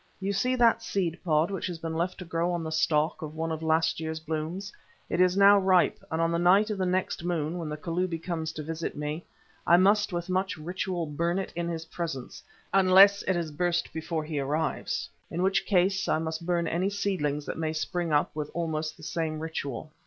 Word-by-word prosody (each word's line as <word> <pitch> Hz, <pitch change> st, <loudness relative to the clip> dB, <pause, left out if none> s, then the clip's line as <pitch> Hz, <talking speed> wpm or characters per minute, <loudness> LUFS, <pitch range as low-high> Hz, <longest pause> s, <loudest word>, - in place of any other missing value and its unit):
You 195 Hz, +1 st, -1 dB
see 250 Hz, +6 st, +1 dB
that 235 Hz, -2 st, +4 dB
seed 180 Hz, -6 st, -2 dB
pod 160 Hz, +1 st, +2 dB
which 195 Hz, -, -3 dB
has 175 Hz, -2 st, -4 dB
been 165 Hz, 0 st, -5 dB
left 170 Hz, +3 st, -1 dB
to 180 Hz, -, -8 dB
grow 170 Hz, +1 st, -1 dB
on 170 Hz, -1 st, -2 dB
the 160 Hz, -, -4 dB
stalk 155 Hz, -1 st, +1 dB
of 155 Hz, 0 st, -6 dB
one 165 Hz, +1 st, -2 dB
of 160 Hz, 0 st, -3 dB
last 160 Hz, 0 st, +2 dB
year's 160 Hz, 0 st, -3 dB
blooms. 160 Hz, +5 st, -4 dB, 0.4 s
It 170 Hz, -, +2 dB
is 185 Hz, +1 st, +3 dB
now 200 Hz, 0 st, +7 dB
ripe, 185 Hz, -2 st, +3 dB
and 160 Hz, -, -2 dB
on 165 Hz, 0 st, +2 dB
the 170 Hz, -, +1 dB
night 195 Hz, +5 st, +4 dB
of 205 Hz, -, -3 dB
the 185 Hz, -, +1 dB
next 185 Hz, +1 st, -1 dB
new 170 Hz, -, -5 dB
moon, 165 Hz, 0 st, -1 dB
when 160 Hz, -2 st, -4 dB
the 150 Hz, -, -4 dB
Kalubi 170 Hz, +2 st, -2 dB
comes 160 Hz, -1 st, -3 dB
to 155 Hz, -, -5 dB
visit 165 Hz, +1 st, -4 dB
me, 150 Hz, +3 st, -4 dB, 0.4 s
I 170 Hz, -, +7 dB
must 205 Hz, +3 st, +4 dB
with 175 Hz, -1 st, -3 dB
much 185 Hz, 0 st, -1 dB
ritual 175 Hz, +2 st, -3 dB
burn 170 Hz, +4 st, -1 dB
it 195 Hz, -, -4 dB
in 170 Hz, 0 st, -2 dB
his 165 Hz, -1 st, -4 dB
presence, 160 Hz, -6 st, -5 dB, 0.3 s
unless 195 Hz, +1 st, +7 dB
it 190 Hz, -, +2 dB
has 170 Hz, -3 st, -2 dB
burst 175 Hz, +3 st, -1 dB
before 160 Hz, 0 st, -3 dB
he 155 Hz, -1 st, -3 dB
arrives, 150 Hz, +3 st, -1 dB, 0.2 s
in 175 Hz, +2 st, -2 dB
which 195 Hz, +1 st, +1 dB
case 190 Hz, 0 st, +2 dB
I -, -, +2 dB
must 160 Hz, +1 st, -4 dB
burn 170 Hz, -2 st, +1 dB
any 180 Hz, +4 st, 0 dB
seedlings 150 Hz, -8 st, -1 dB
that -, -, -5 dB
may 160 Hz, -1 st, -1 dB
spring 170 Hz, +1 st, -2 dB
up 145 Hz, 0 st, +1 dB
with 150 Hz, -1 st, -3 dB
almost 160 Hz, -2 st, -2 dB
the -, -, -15 dB
same 160 Hz, -1 st, -2 dB
ritual." 155 Hz, -3 st, -5 dB
170 Hz, 220 wpm, -28 LUFS, 160-185 Hz, 0.4 s, now